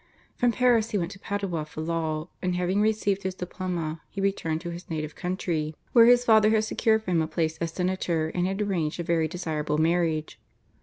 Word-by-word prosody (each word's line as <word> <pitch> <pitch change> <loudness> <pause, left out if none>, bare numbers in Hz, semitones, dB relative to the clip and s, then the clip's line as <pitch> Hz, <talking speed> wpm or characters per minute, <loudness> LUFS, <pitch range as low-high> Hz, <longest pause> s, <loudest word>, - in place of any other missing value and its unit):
From 245 -1 +2
Paris 235 -3 +3
he 210 - 0
went 175 -1 -2
to 195 - -11
Padua 195 -6 -2
for 155 +1 -8
law, 160 -1 -2
and 180 -1 0
having 180 +3 +1
received 210 -2 +1
his 190 -1 -3
diploma 175 -3 -4
he 200 - -7
returned 195 -5 0
to 175 -1 -5
his 170 +1 -9
native 155 -2 -3
country, 170 -4 -2 0.2
where 230 -1 +8
his 245 0 +6
father 220 -2 +6
had 220 0 +3
secured 220 0 +1
for 185 - -3
him 165 -2 +3
a 160 - -1
place 160 0 -1
as 170 - -1
senator 180 -3 -1
and 180 +2 -1
had 195 +2 -1
arranged 175 -6 -1
a - - -1
very 165 -1 +1
desirable 155 -4 -2
marriage. 160 -1 0
180 Hz, 205 wpm, -26 LUFS, 160-200 Hz, 0.2 s, where